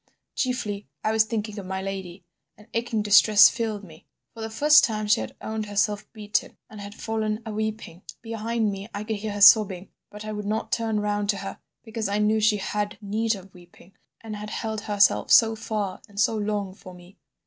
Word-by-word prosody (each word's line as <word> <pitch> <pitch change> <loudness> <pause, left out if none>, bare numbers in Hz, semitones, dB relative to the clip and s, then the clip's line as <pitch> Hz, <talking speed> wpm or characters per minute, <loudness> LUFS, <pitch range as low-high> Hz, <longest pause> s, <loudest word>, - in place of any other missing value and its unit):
Chiefly, 230 -6 -2 0.2
I 215 - +1
was 220 0 +3
thinking 215 -2 -4
of 190 - -8
my 190 0 -3
lady. 190 -1 -6 0.3
An 210 - -17
aching 230 -2 -1
distress 210 0 +7
filled 220 -3 -3
me. 165 -1 -15 0.3
For 225 - -10
the 220 - -4
first 300 +6 +6
time 215 -3 0
she 215 +2 +3
had - - -7
owned 220 -1 -4
herself 205 0 -1
beaten 210 -2 -2
and 215 -1 -9
had 200 +1 -9
fallen 220 0 -3
a 220 - -5
weeping. 215 -5 -4 0.2
Behind 225 -1 -1
me 195 +2 -7
I 205 - -4
could 215 0 -3
hear 210 0 -4
her 205 - -5
sobbing, 200 -3 +6 0.2
but 210 +1 -10
I 215 - -4
would 210 -1 -5
not 215 +2 -2
turn 225 -2 0
round 205 -1 -1
to 205 - +2
her 195 0 -7 0.2
because 220 -2 -4
I 200 - 0
knew 210 +1 +2
she 215 0 +3
had 210 +1 -3
need 220 +2 -1
of 190 -1 -13
weeping, 175 +1 -18 0.3
and 220 -2 -7
had 210 0 -7
held 220 -1 -4
herself 205 -2 +2
so 225 -1 +6
far 215 -4 -4
and 200 0 -9
so 220 - +3
long 205 -2 -2
for 185 -1 -13
me. 180 +2 -17
210 Hz, 205 wpm, -25 LUFS, 200-220 Hz, 0.3 s, distress